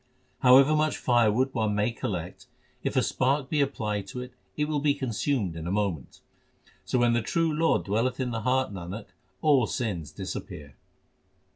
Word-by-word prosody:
However 135 +4 +6
much 155 0 +1
firewood 120 +2 +2
one 110 -3 0
may 105 +3 +1
collect, 90 -6 -5 0.3
if - - -2
a - - +3
spark 135 +1 0
be 150 -2 +2
applied 105 -7 -2
to 125 - -6
it, 125 0 -9 0.2
it 150 - +1
will 150 -1 -1
be 145 0 +2
consumed 125 - -1
in 80 0 -6
a - - -2
moment; 95 -9 -2 0.6
So - - 0
when 120 -1 +3
the 120 - +2
true 165 +7 0
Lord 160 +2 +2
dwelleth 115 +6 0
in 125 -2 -1
the 115 -1 -3
heart, 130 -1 +1
Nanak, 95 +3 -7 0.3
all 140 -7 +4
sins 90 - -3
disappear. 70 -2 -7
120 Hz, 170 wpm, -27 LUFS, 105-135 Hz, 0.6 s, However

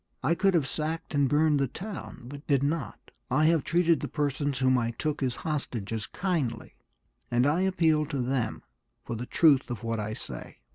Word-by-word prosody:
I 165 - +3
could 195 +1 +2
have 155 -5 +3
sacked 160 +4 -3
and 140 -2 +3
burned 150 0 +3
the 135 - +2
town, 185 - -7
but 140 +3 -10
did 140 -2 +3
not; 155 +3 -3 0.2
I 140 +4 +3
have 160 -3 +4
treated 170 -2 +3
the - - -3
persons 145 -2 -1
whom 130 0 +3
I 115 -2 +1
took 150 +6 -3
as 125 -2 0
hostages 115 -8 -3
kindly, 150 - -2 0.6
and 120 +1 +3
I 150 +5 +2
appeal 160 -5 +2
to 140 - -3
them 125 -1 -1 0.4
for 115 - -4
the 120 +2 -5
truth 140 -5 +4
of 120 -1 -5
what 115 -1 -1
I 105 +1 -3
say. - - -8
145 Hz, 190 wpm, -28 LUFS, 125-160 Hz, 0.6 s, have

